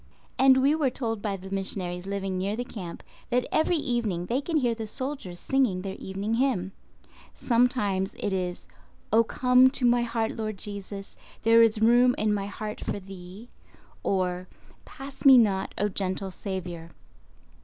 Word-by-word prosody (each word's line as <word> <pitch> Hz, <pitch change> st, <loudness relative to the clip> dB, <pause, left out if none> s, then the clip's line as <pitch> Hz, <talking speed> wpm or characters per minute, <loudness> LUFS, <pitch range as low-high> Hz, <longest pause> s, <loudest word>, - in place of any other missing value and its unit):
And 265 Hz, 0 st, +6 dB
we 280 Hz, +2 st, +4 dB
were 305 Hz, -4 st, +1 dB
told 225 Hz, -4 st, -3 dB
by 200 Hz, -2 st, -2 dB
the 190 Hz, +1 st, -11 dB
missionaries 190 Hz, -2 st, -3 dB
living 195 Hz, -1 st, -3 dB
near 195 Hz, +3 st, -1 dB
the 245 Hz, +2 st, -3 dB
camp 180 Hz, -8 st, -8 dB, 0.3 s
that 250 Hz, 0 st, +1 dB
every 320 Hz, +3 st, +2 dB
evening 230 Hz, -, -1 dB
they 245 Hz, +8 st, 0 dB
can 325 Hz, +2 st, -1 dB
hear 245 Hz, -5 st, +2 dB
the 225 Hz, -1 st, -6 dB
soldiers 255 Hz, -8 st, -5 dB
singing 250 Hz, -10 st, +1 dB
their 195 Hz, -1 st, -4 dB
evening 195 Hz, +3 st, -3 dB
hymn. 230 Hz, -7 st, 0 dB, 0.6 s
Sometimes 225 Hz, -5 st, +1 dB
it 205 Hz, -, -2 dB
is, 180 Hz, -1 st, -3 dB, 0.5 s
"Oh, 230 Hz, +1 st, +6 dB
come 250 Hz, +2 st, +4 dB
to 260 Hz, -1 st, -1 dB
my 240 Hz, 0 st, +4 dB
heart 230 Hz, -1 st, -1 dB
Lord 215 Hz, -2 st, -4 dB
Jesus; 200 Hz, 0 st, -6 dB, 0.3 s
there 230 Hz, +1 st, +6 dB
is 220 Hz, -1 st, +3 dB
room 245 Hz, +2 st, +5 dB
in 215 Hz, 0 st, +1 dB
my 200 Hz, -1 st, -2 dB
heart 210 Hz, +1 st, -6 dB
for -, -, -3 dB
Thee"—or 185 Hz, -1 st, -6 dB, 0.4 s
"Pass 275 Hz, 0 st, -10 dB
me 270 Hz, -2 st, +9 dB
not, 200 Hz, -5 st, +2 dB
O 205 Hz, -, +1 dB
gentle 190 Hz, -1 st, -2 dB
Saviour." 180 Hz, -4 st, -6 dB
210 Hz, 160 wpm, -27 LUFS, 190-245 Hz, 0.6 s, me